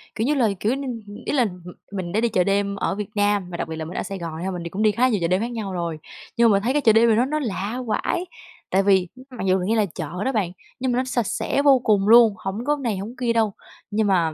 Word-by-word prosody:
kiểu 220 - -1
như 295 - +3
là, 235 -6 +3
kiểu 220 +4 +1
như, 275 -1 -5 0.2
ừm, 205 - -10
ý - - -1
là 255 -5 +3
m 180 -3 -7 0.3
mình 185 -4 -4
đã 215 +4 +1
đi 235 - +2
chợ 180 -3 +2
đêm 200 +1 0
ở 195 - -1
Việt 210 0 -5
Nam 205 -3 +1
và 170 - -5
đặc - - -3
biệt 160 - -4
là 160 - -4
mình 170 - -7
ở - - -1
Sài 195 - -5
Gòn 165 -1 -6
nha, 190 - -2
mình 175 -2 -5
đi 170 - -5
cũng 200 +5 -2
đi 215 - +5
khá 245 +5 +2
nhiều 215 - +1
chợ 170 - +1
đêm 185 +3 +1
khác 235 +2 -3
nhau 210 -5 -4
rồi, 170 -3 -3 0.4
nhưng 235 -1 +5
mà 205 - +4
mình 200 - 0
thấy 255 +4 +1
cái 295 - +2
chợ 220 -4 +5
đêm 230 +1 +5
này 220 - +4
nó 245 - +3
nó 305 +3 -1
lạ 225 -1 -3
vãi. 345 +10 -1 0.4
Tại 195 +1 +2
vì 190 -2 +3 0.2
mặc 230 -6 -5
dù 185 0 +3
nghe 200 +5 0
là 215 -2 +3
chợ 175 +1 -5
đó 265 - +1
bạn, 200 -7 -1 0.3
nhưng 260 0 0
mà 245 - 0
nó 255 - +2
sạch 240 -4 -1
sẽ 280 - 0
vô 275 -3 +6
cùng 205 -3 +2
luôn, 230 -1 +7
hổng 210 +4 -5
có 295 0 +1
này, 225 -6 -1
hổng 215 +6 -6
kia 240 -2 0
đâu, 220 -3 +1 0.4
nhưng 210 0 +1
mà 170 -5 +2
205 Hz, 310 wpm, -23 LUFS, 190-235 Hz, 0.4 s, luôn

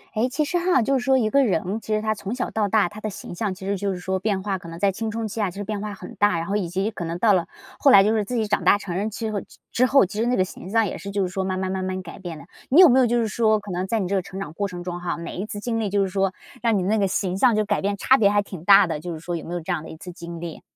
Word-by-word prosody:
哎， 225 +3 +2
其 295 +4 0
实 350 - 0
哈 350 -8 +3
就 270 +2 +1
是 - - -5
说 265 +1 +3
一 220 -4 +1
个 275 0 +4
人， 195 -1 0
其 - - -16
实 - - +1
他 215 0 0
从 210 +1 -5
小 255 - -3
到 215 -2 0
大 205 -1 +3
他 210 +4 -10
的 215 - -3
形 190 - -8
象， 200 +3 -2
其 190 - -10
实 200 - 0
就 200 +1 -2
是 185 - -4
说 190 +1 -2
变 195 -1 -1
化 195 -2 -2
可 170 - -10
能 165 - -8
在 195 +2 +2
青 220 +4 -4
春 225 0 -3
期 215 +1 -4
啊 205 - +1
其 180 - -12
实 205 - -3
变 210 0 -4
化 210 -1 -5
很 235 - -10
大， 205 -3 +3
然 165 - -3
后 200 +4 -2
以 190 -5 -1
及 190 +5 -1
可 195 - -6
能 170 +1 -3
到 210 +1 +4
了 170 -3 +1 0.3
后 280 - +5
来 200 -6 +8
就 215 +2 +2
是 215 -2 +1
自 245 +5 -4
己 220 -2 0
长 205 - 0
大 - - +5
成 190 -4 -6
人 205 +4 -1
之 220 +1 -4
后 205 -2 -2 0.3
之 255 +2 +3
后， 275 -4 +5
其 205 +3 -6
实 230 - +1
那 250 - +2
个 185 - +3
形 185 - -10
象 225 +2 +3
也 - - -5
是 200 - -7
就 200 0 0
是 185 - -2
说 190 +1 -2
慢 185 0 -2
慢 185 0 -2
慢 190 0 -2
慢 185 0 -3
改 170 - -10
变 175 -4 -7
的。 145 - -12 0.2
你 285 - +5
有 370 - +11
没 260 +1 +5
有 255 - +4
就 240 +1 +1
是 230 - +1
说， 220 -1 +2
可 200 -1 -9
能 180 +1 -2
在 225 +3 0
你 190 - -1
这 195 - -3
个 190 - +2
成 185 +2 -8
长 175 -6 -6
过 200 +4 -2
程 175 -2 -7
中 175 0 -5
哈， 175 -1 -3
每 170 +1 -7
一 195 +3 -4
次 205 - -6
经 225 +1 -2
历 215 -2 -1
就 200 0 +2
是 190 - -2
说， 195 0 0 0.3
让 230 -3 +2
你 185 - 0
那 215 +4 +1
个 200 - +2
形 185 -1 -1
象 235 +3 +4
就 215 0 +1
改 - - 0
变 200 +1 -1
差 260 - +4
别 210 -6 +4
还 205 - +2
挺 185 -5 -9
大 200 0 +8
的， 165 -3 -3
就 170 +2 -5
是 160 - -7
说 175 +2 -4
有 165 - -5
没 175 - -5
有 175 - -3
这 175 +3 -2
样 160 - -2
的 - - -10
一 160 - -9
次 180 - -9
经 170 -1 -8
历？ 165 -1 -7
200 Hz, 395 characters per minute, -23 LUFS, 185-220 Hz, 0.3 s, 有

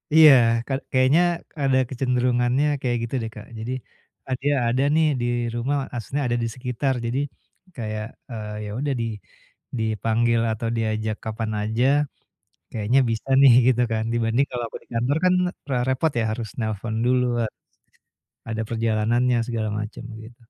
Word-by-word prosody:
Iya, 155 -2 +10 0.4
ka 135 - -2 0.2
kayaknya 130 +5 +4 0.4
ada 135 -1 +3
kecenderungannya 125 +1 +1 0.2
kayak 120 -2 0
gitu 115 - -5
deh 110 - -3
Kak. 105 - -9
Jadi, 115 +3 -4 0.6
eee, 130 - 0
"Dia 145 +1 +2
ada 125 +3 +2
nih 160 - +4 0.2
di - - 0 0.3
rumah," 125 +5 0 0.2
maksudnya 125 +5 -3
ada 120 0 0
di - - 0
sekitar 125 +1 -1
jadi, 120 +3 -1 0.6
kayak, 110 -3 -4 0.3
eee, 105 -2 -5
yaudah 130 +7 -2
di - - -1 0.7
dipanggil 115 +1 +1
atau 115 +1 -3
diajak 110 -1 -1
kapan 110 0 -3
aja, 110 +4 0 0.9
kayaknya 110 +5 +2
bisa 115 +4 -3
nih, 135 -3 +9 0.2
gitu 125 -1 +3
kan, 110 -1 0
dibanding 120 +3 +2
kalau 120 -1 -3
aku - - -8
di - - -31
kantor 120 +6 +1
kan 185 - +5 0.4
re 135 - 0
repot 130 +5 +1
ya 115 - +1
harus 115 0 -4
nelepon 110 0 -3
dulu, 125 0 +3 0.2
harus 110 -2 -3 0.9
ada 110 0 -2
perjalanannya, 115 +2 +1
segala 110 -2 -1
macam, 105 +2 -6 0.2
gitu. 120 +2 -15
120 Hz, 155 wpm, -24 LUFS, 110-130 Hz, 0.9 s, Iya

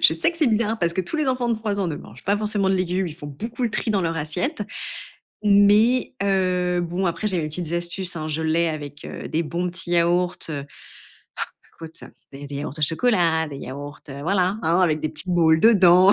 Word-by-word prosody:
Je - - +7
sais 165 - +2
que 340 - -6
c'est 320 -3 +3
bien 225 -1 +1
parce 170 -5 +1
que 185 - 0
tous 185 - -4
les 305 -2 0
enfants 250 -2 0
de 235 - +2
3 215 -2 -2
ans 185 - 0
ne 155 - -3
mangent - - -13
pas 200 +2 +2
forcément 205 -2 0
de 190 - +3
légumes. 185 0 0
Ils 155 - -8
font 145 - -9
beaucoup 225 - -6
le 235 - +1
tri 215 +1 -1
dans 205 -2 +2
leur 165 -1 -1
assiette. 180 - -2 0.8
Mais 210 +4 +4
heu, 180 -2 +1
bon, 175 +3 -2
après, 175 +5 -1
j'ai 185 -4 +2
mes 155 - -2
petites 160 +1 -4
astuces, 175 +2 -3
hein. 155 -1 -4
Je 155 +1 -2
l'ai 165 +1 +2
avec 145 -2 -6
heu, - - -7
des 165 +2 -1
bons 175 +3 -2
petits 175 0 -4
yaourts, 175 +1 +2
heu. 140 -3 -4 1.2
Ah, 165 - -6
écoute, 160 - -15
heu, - - -11 0.2
des 140 +1 -8
yaourts 145 0 -4
au - - -3
chocolat, 165 - +2
des 140 - -7
yaourts, 145 +2 -8
heu, 140 +1 -7
voilà, 185 +4 +1
avec 165 -2 +2
des 155 - -1
petites 155 +4 -3
boules 160 -2 +4
dedans. 190 -3 +7
175 Hz, 225 wpm, -23 LUFS, 160-200 Hz, 1.2 s, Je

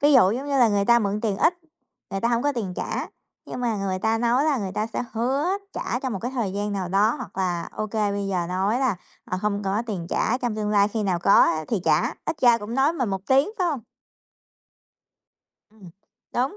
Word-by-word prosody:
Ví 290 +1 +5
dụ 220 -8 +6
giống 260 +6 -3
như 275 -1 +1
là 240 -3 +6
người 200 -1 +1
ta 235 +1 +5
mượn 205 -1 -1
tiền 210 -4 -1
ít, 340 - +3 0.6
người 195 - -3
ta 235 - +1
hổng 235 0 +1
có 290 0 +1
tiền 200 -7 -4
trả, - - -3 0.4
nhưng - - -6
mà 230 -3 0
người 190 -1 -2
ta 220 +3 +1
nói 240 +4 +2
là 300 -3 +2
người 195 -3 -4
ta 215 - -1
sẽ 230 +2 -4
hứa 260 +6 0 0.3
trả - - -2
trong 260 -4 -3
một 195 - -3
cái 245 - -2
thời 230 -8 -2
gian 205 +1 -2
nào 190 -3 -2
đó, 205 +4 +3
hoặc - - -8
là 175 -3 -1
ô 215 - -3
kê 210 -1 0
bây 200 -1 -2
giờ 180 -3 -1
nói 195 +6 0
là, 245 -8 +1 0.3
à, 185 - -3
không 205 -1 0
có 200 +4 0
tiền 185 -7 -4
trả, 245 +3 0
trong 240 -4 -2
tương 210 -1 -1
lai 205 0 +4
khi 215 0 -2
nào 185 -3 0
có 200 +3 +4
á 155 0 +3
thì 220 -6 0
trả, - - +2
ít 320 - -3
ra 240 -2 +6
cũng 215 +3 -6
nói 275 +4 +3
mình 255 -10 -1
một 195 -1 -2
tiếng, 270 +8 +3
phải 365 - +2
hông? 290 -7 -1 1.9
Ừm. 200 -5 -15 0.4
Đúng, 260 +11 0
215 Hz, 245 wpm, -24 LUFS, 195-245 Hz, 1.9 s, dụ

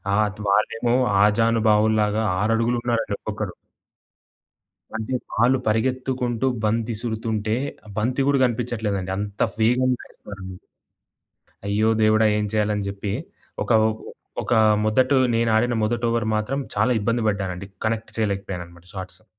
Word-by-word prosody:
అత్ 105 0 0
వాళ్ళేమో 115 +4 +2 0.3
ఆజానుబావులాగా 110 0 +3 0.2
6 105 +3 +2
అడుగులు 120 +1 +1
ఉన్నారండి 115 -4 0
ఒక్కొక్కరు. 105 -3 -5 1.4
అంటే 110 +3 -3 0.2
వాళ్ళు 125 +3 +4
పరిగెత్తుకుంటూ 125 +2 0 0.2
బంతి 115 +2 0
ఇసురుతుంటే, 110 -1 -2 0.3
ఆ - - -13
బంతి 125 +5 +1
కూడా 140 -1 +3
కనిపించట్లేదండి 110 -6 -2
అంత 100 0 -5 0.2
వేగంగా 125 +3 +2
ఎస్తన్నారండి. 95 -2 -10 1.1
అయ్యో 105 +2 +2
దేవుడా! 110 +1 +4
ఏం 105 - 0
చేయాలని 105 -1 0
చెప్పి. 100 0 -4 0.5
ఒక - - -10 0.7
ఒక - - 0 0.3
మొదటు 130 +5 +3 0.2
నేను 115 0 +2
ఆడిన 120 +2 +2
మొదటి 115 +2 -1
ఓవర్ 115 -1 0
మాత్రం 110 +6 -1 0.2
చాలా 125 - +2
ఇబ్బంది 115 +3 0
పడ్డానండి. 95 -2 -3 0.2
కనెక్ట్ 110 0 -2
చేయలేకపోయాను 100 -4 -2
అన్నమాట 85 0 -18
షాట్సు. 95 +1 -8
110 Hz, 120 wpm, -23 LUFS, 105-120 Hz, 1.4 s, వాళ్ళు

